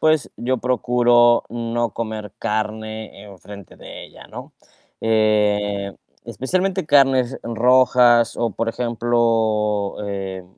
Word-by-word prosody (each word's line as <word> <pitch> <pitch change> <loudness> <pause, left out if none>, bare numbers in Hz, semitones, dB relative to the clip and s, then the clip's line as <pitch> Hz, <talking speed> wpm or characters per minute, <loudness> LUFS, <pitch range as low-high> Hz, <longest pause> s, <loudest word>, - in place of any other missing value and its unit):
pues, 155 -2 +1
yo 130 +2 -2
procuro 120 -1 +2
no 120 0 -2
comer 110 -3 -6
carne 110 -1 -4
enfrente 100 -1 -13
de - - -11
ella, - - -16
¿no? - - -11 0.5
Eh, 105 -2 +1 0.3
especialmente 155 - -2
carnes 135 -3 +2
rojas, 120 0 +3
o 120 -1 -1
por 115 +3 -3
ejemplo, 115 -3 0
eh, 95 -2 -6
115 Hz, 100 wpm, -20 LUFS, 105-120 Hz, 0.5 s, rojas